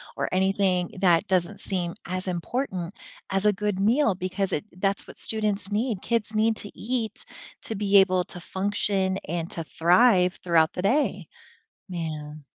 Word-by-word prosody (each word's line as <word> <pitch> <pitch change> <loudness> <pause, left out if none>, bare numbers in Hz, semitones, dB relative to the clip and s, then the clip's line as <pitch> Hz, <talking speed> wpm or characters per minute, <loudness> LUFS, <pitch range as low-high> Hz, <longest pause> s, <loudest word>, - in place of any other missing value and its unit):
or - - -2
anything 190 -1 +1
that 175 -3 +4
doesn't 185 +1 0
seem 175 -3 -2
as 185 +1 -4
important 185 0 -3 0.3
as 195 +1 +1
a 210 - +6
good 205 -1 -2
meal 225 +2 +3
because 185 +1 -2
it 150 - -1 0.2
that's 195 0 0
what - - -12
students 210 -3 0
need. 215 -1 -1
Kids 230 -2 -1
need 220 +1 +2
to 205 - -4
eat 230 -2 -3 0.4
to 225 - -4
be 200 0 +3
able 185 -2 +4
to 180 - -8
function 190 0 -1
and 170 +1 -3
to 165 - -4
thrive 180 +2 +4
throughout 165 -2 +3
the - - -3
day. 260 +10 +1 0.6
Man,. 155 -4 -5
190 Hz, 160 wpm, -26 LUFS, 180-210 Hz, 0.6 s, a